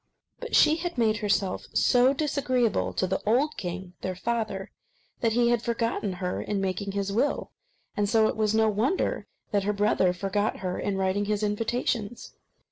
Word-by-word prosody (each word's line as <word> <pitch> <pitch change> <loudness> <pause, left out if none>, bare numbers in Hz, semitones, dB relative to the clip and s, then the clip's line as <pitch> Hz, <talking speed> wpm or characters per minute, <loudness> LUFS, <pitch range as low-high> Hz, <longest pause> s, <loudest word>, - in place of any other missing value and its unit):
But - - -3
she 310 - +6
had 345 -3 -4
made 220 -2 +2
herself 200 -3 -1
so 250 +1 +4
disagreeable 270 -5 0
to - - 0
the 190 +1 -1
old 260 +8 +2
king, 180 0 -6
their 185 -1 -3
father, 215 -1 -3 0.5
that 230 -2 +1
he 240 0 +3
had 240 -2 +2
forgotten 230 -4 -1
her 180 0 -3
in 205 - -2
making 195 +1 -2
his 200 0 -2
will; 240 +8 0 0.4
and 205 -1 0
so 220 0 +4
it - - -1
was 215 0 +1
no 220 0 +4
wonder 220 - 0 0.2
that 205 - +2
her 210 - +1
brother 200 -3 +2
forgot 195 +3 -1
her 180 - -2
in 200 -1 -1
writing 190 +2 0
his 210 0 -1
invitations. 225 +1 -2
210 Hz, 175 wpm, -27 LUFS, 195-235 Hz, 0.5 s, she